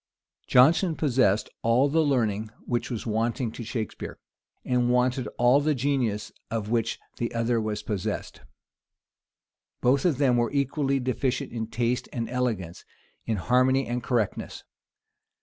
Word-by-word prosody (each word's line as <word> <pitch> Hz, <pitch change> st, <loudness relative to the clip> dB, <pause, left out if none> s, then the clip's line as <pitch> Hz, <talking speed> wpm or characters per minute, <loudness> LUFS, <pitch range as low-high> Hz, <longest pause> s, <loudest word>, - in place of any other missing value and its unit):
PLIN 130 Hz, +6 st, +7 dB
Jonson 175 Hz, -2 st, -1 dB
possessed 125 Hz, -9 st, +2 dB
all 120 Hz, +4 st, +3 dB
the 160 Hz, +3 st, +2 dB
learning 110 Hz, -7 st, +1 dB, 0.2 s
which 120 Hz, -1 st, -1 dB
was 120 Hz, -4 st, -4 dB
wanting 115 Hz, +2 st, -1 dB
to 120 Hz, -, -7 dB
Shakspeare, 110 Hz, -1 st, -5 dB, 0.5 s
and 125 Hz, -1 st, +1 dB
wanted 125 Hz, 0 st, +1 dB
all 120 Hz, +3 st, +5 dB
the 150 Hz, +1 st, +1 dB
genius 120 Hz, -6 st, -1 dB, 0.2 s
of 110 Hz, -1 st, -3 dB
which 115 Hz, -1 st, 0 dB, 0.2 s
the 120 Hz, -, -2 dB
other 115 Hz, 0 st, +1 dB
was 105 Hz, -1 st, -3 dB
possessed. 100 Hz, -4 st, -4 dB, 1.4 s
Both 130 Hz, +2 st, +3 dB
of 165 Hz, -8 st, +2 dB
them 130 Hz, -4 st, +3 dB
were 120 Hz, -1 st, +1 dB
equally 140 Hz, 0 st, 0 dB
deficient 130 Hz, 0 st, -1 dB
in 115 Hz, -2 st, -4 dB
taste 120 Hz, +2 st, -1 dB
and 115 Hz, -2 st, -3 dB
elegance, 110 Hz, -9 st, -2 dB, 0.4 s
in 110 Hz, -, +1 dB
harmony 130 Hz, +6 st, +3 dB
and 120 Hz, +1 st, -2 dB
correctness. 115 Hz, -4 st, -2 dB
120 Hz, 140 wpm, -26 LUFS, 115-130 Hz, 1.4 s, PLIN